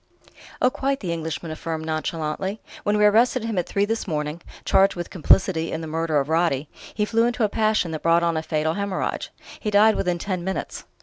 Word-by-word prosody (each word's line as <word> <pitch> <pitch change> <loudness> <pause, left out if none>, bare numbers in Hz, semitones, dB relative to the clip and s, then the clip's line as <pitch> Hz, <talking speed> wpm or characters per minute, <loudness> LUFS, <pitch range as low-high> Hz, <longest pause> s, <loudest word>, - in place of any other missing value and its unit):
"Oh, 255 - +5
quite!" 275 +1 -1
the 175 -4 -3
Englishman 160 0 -4
affirmed 160 0 -4
nonchalantly, 160 +5 -2 0.2
"When 210 0 +1
we 210 - +4
arrested 230 +3 +4
him 225 -4 -1
at 175 - -2
three 200 0 +1
this 225 +1 -2
morning 150 0 -3 0.2
charged 195 0 +4
with 175 -1 -5
complicity 165 -1 +3
in 160 - -3
the - - -5
murder 160 -1 0
of 135 - -2
Roddy 160 -3 +1 0.3
he 210 - +1
flew 230 +2 +2
into 240 -1 -1
a 210 - +3
passion 215 -5 +1
that 155 - -4
brought 170 +1 +3
on 170 -1 +1
a 160 - 0
fatal 160 0 -1
haemorrhage. 200 -1 -2 0.3
He 215 - -2
died 210 +2 +5
within 180 -2 0
ten 180 0 -3
minutes." 190 +1 -4
175 Hz, 205 wpm, -23 LUFS, 160-210 Hz, 0.3 s, Oh